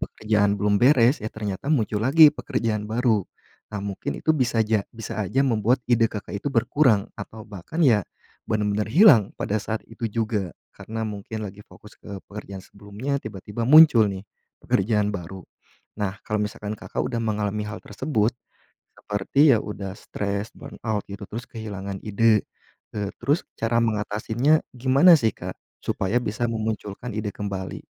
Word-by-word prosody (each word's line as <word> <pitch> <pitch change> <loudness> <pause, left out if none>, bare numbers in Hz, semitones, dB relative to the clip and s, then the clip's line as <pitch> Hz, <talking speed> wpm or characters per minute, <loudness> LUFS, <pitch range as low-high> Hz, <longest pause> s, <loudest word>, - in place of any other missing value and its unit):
pekerjaan 105 -2 +1
belum 100 0 +2
beres, 125 0 +5
ya 110 - -3
ternyata 105 +3 -5
muncul 110 -8 +1
lagi 155 +2 +8
pekerjaan 115 -8 -2
baru, 110 -3 +1 0.4
nah 105 -2 -4
mungkin 100 -1 -4
itu 160 - +2
bisa 120 -6 +1
ja 110 -1 +2
bisa 115 -1 -6
aja 130 +8 0
membuat 120 0 +1
ide 115 -1 +5
Kakak 105 -1 -6
itu - - -9
berkurang 120 -3 +2
atau 110 0 -8
bahkan 105 - -4
ya 110 - +4 0.4
benar-benar 105 -1 0
hilang 145 - +7 0.2
pada 105 - -1
saat 110 +2 -4
itu 115 +1 -8
juga, 105 -5 -2 0.2
karena 110 0 -5
mungkin 110 0 -5
lagi 100 -1 -7
fokus 105 - -16
ke 100 -2 -9
pekerjaan 100 -2 -8
sebelumnya 105 +8 -5
tiba-tiba 105 0 -6
muncul 145 -7 +8
nih 95 -1 -4 0.4
pekerjaan 105 +1 +1
baru. 95 -1 -7 0.6
Nah 100 -1 -3
kalau 105 -3 -2
misalkan 105 0 -5
Kakak - - -4
udah 115 - -2
mengalami 105 -1 -1
hal 105 +1 -6
tersebut 110 0 0 0.7
seperti 130 +8 +3
ya 110 - +3
udah 100 -3 -6
stres, 100 +1 -3
burnout 110 -3 -4
gitu, 100 +1 -7
terus 120 +3 -6
kehilangan 100 -4 -6
ide, 110 0 +2 0.5
eee, 100 -2 -2
terus 140 +7 +1
cara 115 +1 +1
mengatasinya 110 +7 +1
gimana 135 +8 +5
sih 110 -3 +2
Kak, - - -6 0.3
supaya 100 +5 0
bisa 110 +3 -2
memunculkan 110 0 -4
ide 105 0 -2
kembali? 100 -2 -5
110 Hz, 150 wpm, -24 LUFS, 105-120 Hz, 0.7 s, lagi